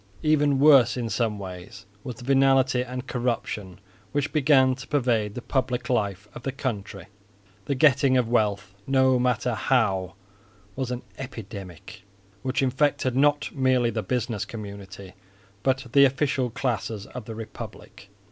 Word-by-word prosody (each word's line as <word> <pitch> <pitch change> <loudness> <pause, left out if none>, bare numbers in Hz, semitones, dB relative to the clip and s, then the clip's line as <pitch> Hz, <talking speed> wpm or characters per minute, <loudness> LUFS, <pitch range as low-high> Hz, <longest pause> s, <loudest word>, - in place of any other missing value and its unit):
Even 150 -2 +3
worse 135 -4 +6
in 120 -2 -2
some 110 0 0
ways 95 0 -9 0.2
was 125 - -6
the 125 - -12
venality 135 -1 +3
and 125 +1 -6
corruption 115 -7 -3 0.3
which 145 0 -1
began 135 -3 +4
to 135 +1 -9
pervade 120 -7 0
the 125 - -6
public 130 -2 -1
life 100 -4 -1
of - - -9
the 135 - -3
country. 105 -8 -5 0.6
The 140 - -1
getting 135 -1 +4
of 125 -2 +2
wealth, 105 -4 0
no 130 -1 +3
matter 125 0 +1
how, 105 -6 +1 0.6
was 130 -2 -3
an 125 0 -4 0.2
epidemic, 100 - -9 0.4
which 130 +1 -1
infected 130 -1 +1
not 145 +2 +2
merely 130 -3 +2
the 110 0 -2
business 115 0 -2
community, 100 -3 -9 0.5
but 130 +1 0
the 140 +1 +7
official 135 -1 0
classes 110 -4 -3
of 125 -3 -9
the 110 - -7
republic. 110 -2 -10
125 Hz, 145 wpm, -25 LUFS, 105-135 Hz, 0.6 s, the